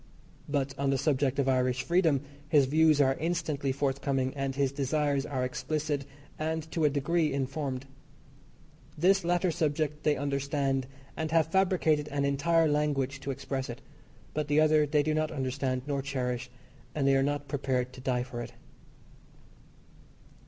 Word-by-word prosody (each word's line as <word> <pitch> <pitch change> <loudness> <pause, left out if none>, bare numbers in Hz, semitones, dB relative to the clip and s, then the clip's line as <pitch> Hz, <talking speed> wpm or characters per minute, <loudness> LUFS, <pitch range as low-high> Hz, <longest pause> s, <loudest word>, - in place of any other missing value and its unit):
But 140 -2 0
on 140 -1 +1
the 135 - +2
subject 140 -1 +1
of 140 -1 +1
Irish 130 -1 +1
freedom 170 -6 +2 0.3
his 145 -3 +5
views 155 +2 +4
are 135 -2 +4
instantly 160 -5 -1
forthcoming, 135 -1 -1
and 135 -1 -3
his 140 -1 +1
desires 140 0 0
are 130 -3 -1
explicit, 145 +2 -2 0.3
and, 160 +1 -1
to 160 -2 +1
a - - +5
degree, 150 +3 +1
informed. 135 -1 -3 1.1
This 190 +4 +4
latter 175 +1 +1
subject 150 -1 -1
they 150 -2 +2
understand 140 -1 -1 0.3
and 160 0 -2
have 160 0 +2
fabricated 175 -6 +2
an 140 -1 -1
entire 160 +4 +3
language 145 -2 0
to 140 - -6
express 135 -1 -3
it, 120 +2 -6 0.5
but 150 -1 -2
the 145 +1 +3
other 155 -1 +4
they 145 0 +2
do 155 +1 0
not 155 0 0
understand 130 -2 -2
nor 140 -2 -1
cherish, 130 -2 -3 0.5
and 140 -3 +1
they 135 - +5
are 135 - +3
not 145 +1 -1
prepared 130 -3 -1
to 130 - -10
die 125 -1 0
for 125 -2 -6
it. 120 0 -8
140 Hz, 160 wpm, -29 LUFS, 135-155 Hz, 1.1 s, his